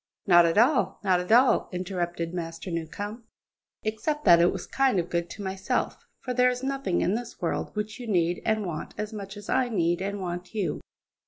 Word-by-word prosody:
"Not 175 -3 +7
at 165 - 0
all, 255 +5 +3
not 185 -3 +3
at 180 +3 -4
all," 250 +3 +5
interrupted 175 -2 -3
Master 165 +1 -5
Newcombe, 205 +8 -5 0.6
"except 295 +8 -2
that 170 -1 +8
it 175 - +5
was - - -5
kind 270 -5 +2
and 175 -1 0
good 170 0 -2
to 205 - -7
myself; 190 0 -2
for 250 - -3
there 250 0 +4
is 250 +1 -3
nothing 270 -8 -1
in 190 - +1
this 235 +1 -5
world 175 +3 -2
which 210 +2 -4
you 245 - -7
need 175 -4 +1
and 215 -1 0
want 165 -4 -5
as 210 +1 -4
much 200 -1 -7
as 205 - -10
I 255 -2 +1
need 175 -5 +1
and 200 +1 -3
want 180 +2 -5
you." 195 -7 -1
195 Hz, 200 wpm, -27 LUFS, 175-225 Hz, 0.6 s, that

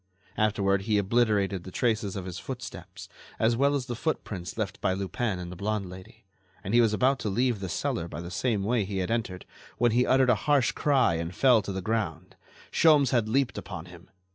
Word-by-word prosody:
Afterward 100 -2 +1
he 105 - +3
obliterated 100 -3 +1
the 95 - -8
traces 110 -1 -1
of 95 -2 -5
his 90 -1 -6
footsteps, 95 -7 -8 0.3
as 115 +1 +2
well 140 +3 +2
as 135 -3 -2
the 125 - -4
footprints 105 - -4
left 100 -4 -3
by 95 - +1
Lupin 100 +2 -2
and 90 -1 -7
the - - -7
blonde 100 0 -3
lady, 95 +1 -13 0.4
and 100 - -4
he 120 - +6
was 115 -2 +3
about 130 +5 +2
to 105 - -2
leave 120 +2 +1
the 95 -1 -5
cellar 85 0 -2
by - - -7
the 85 +1 -7
same 110 -2 0
way 115 +3 +1
as 95 - -3
he 100 -1 -4
had 95 +2 -1
entered, 110 -6 -2 0.3
when 120 -1 +3
he 125 +2 +2
uttered 130 -1 +4
a 110 +5 -1
harsh 140 -4 +4
cry 135 - +2
and 85 +2 -4
fell 125 -5 +5
to 100 - -5
the 95 -1 -4
ground. 90 -6 -3 0.4
Sholmes 150 -5 +4
had 115 -4 +1
leaped 130 -2 +1
upon 90 -4 -8
him. 90 -1 -14
105 Hz, 215 wpm, -27 LUFS, 95-120 Hz, 0.4 s, he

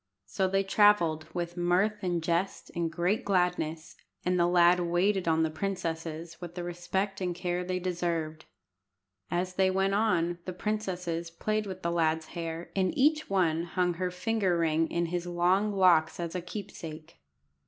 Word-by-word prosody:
So 145 - 0
they 195 +1 +1
travelled, 190 -6 +3
with 175 0 -4
mirth 185 +5 +1
and 175 -3 -1
jest 170 +3 -1
and 170 -1 -1
great 185 +8 0
gladness, 180 -4 0 0.3
and 180 0 +2
the 170 - +4
lad 175 0 +5
waited 175 +2 +1
on 160 0 +3
the 160 - 0
princesses 165 -2 -4
with 175 -1 -8
the 175 - -4
respect 190 +3 -3
and 180 -1 -1
care 180 0 -2
they 185 0 -2
deserved. 170 -3 -2 0.8
As 180 +1 -1
they 190 0 +3
went 195 +1 +1
on, 175 -5 +1
the 185 - -4
princesses 180 -4 -3
played 215 +5 -2
with 185 -1 -7
the 170 - 0
lad's 160 -1 +1
hair, 165 0 -5
and 185 -2 0
each 305 +3 +3
one 170 -5 +2
hung 180 +1 0
her 180 +2 -2
finger 190 -1 0
ring 165 -1 +1
in 170 0 0
his 175 +1 -3
long 180 +4 +2
locks 180 -5 +4
as 170 -1 -3
a 180 - -2
keepsake. 165 -5 -8
175 Hz, 165 wpm, -29 LUFS, 170-190 Hz, 0.8 s, lad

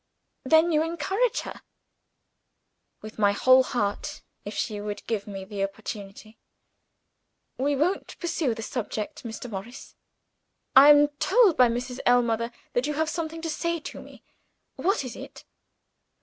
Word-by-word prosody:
"Then 320 +5 +4
you 305 -1 +3
encourage 340 +9 0
her?" - - -9 1.4
"With 215 0 -10
my 205 -1 +4
whole 255 +5 +6
heart 210 -6 -3 0.2
if 205 - -6
she 210 -1 -3
would 205 0 -6
give 215 -3 -3
me 195 -2 -7
the 200 0 -4
opportunity!" 205 +1 -7 1.2
"We 285 +2 +1
won't 330 +8 -1
pursue 320 -8 -1
the 225 - -6
subject, 215 -3 -4
Mr. 230 +1 -7
Morris. 225 +3 -8 0.8
I 275 +2 +10
am 290 0 +7
told 440 -9 +4
by 250 - +6
Mrs. 245 +2 -4
Ellmother 235 -1 +2 0.2
that 245 +3 0
you 300 - -2
have 315 +1 0
something 325 0 -4
to 330 - -2
say 335 +2 -2
to - - -8
me. - - -15 0.5
What 390 -2 0
is 250 - -7
it?" - - -11
250 Hz, 145 wpm, -26 LUFS, 215-315 Hz, 1.4 s, I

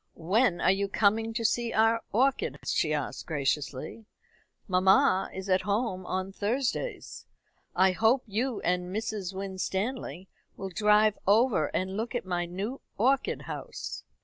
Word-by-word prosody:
"When 185 +3 +2
are - - +5
you 200 +1 0
coming 220 +3 +2
to 230 -1 -1
see 235 +1 +1
our 225 +1 +3
orchids?" 265 +5 0
she 155 - +1
asked 150 -3 -3
graciously. 145 - -2 0.6
"Mamma 190 +3 +4
is 190 +1 -7
at 185 -1 +3
home 200 -3 -1
on 185 +1 -2
Thursdays. 250 - -3 0.5
I 190 +1 +5
hope 225 +7 +3
you 230 +3 -2
and 180 0 0
Mrs. 210 -2 -3
Winstanley 190 - -3 0.3
will 195 - -5
drive 210 +3 +3
over 210 - +4
and 190 +1 -2
look 235 +3 -3
at 245 - -2
my 175 -1 -1
new 200 +9 -5 0.2
orchid 260 +5 +1
house. - - -6
200 Hz, 140 wpm, -28 LUFS, 185-230 Hz, 0.6 s, are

